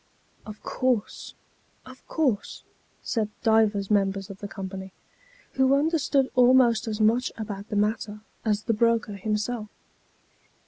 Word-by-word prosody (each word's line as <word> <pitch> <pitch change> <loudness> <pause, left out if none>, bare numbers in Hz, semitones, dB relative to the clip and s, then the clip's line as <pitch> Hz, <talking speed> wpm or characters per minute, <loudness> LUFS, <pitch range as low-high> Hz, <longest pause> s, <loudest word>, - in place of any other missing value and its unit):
" - - -35
Of 210 0 -10
course, 250 -5 -2 0.5
of 255 0 -13
course," 265 -10 -1 0.4
said 220 -3 -1
divers 220 -3 +2
members 195 -1 +1
of 195 - -11
the 205 - -6
company, 190 -1 -7 0.6
who 265 +1 +3
understood 285 -3 +1
almost 245 -2 +4
as 215 -1 -3
much 225 +4 +2
about 205 -2 -6
the - - -3
matter 210 0 -1 0.2
as 215 -1 0
the 230 - 0
broker 230 -1 +1
himself. 215 +2 -3
220 Hz, 130 wpm, -26 LUFS, 205-245 Hz, 0.6 s, almost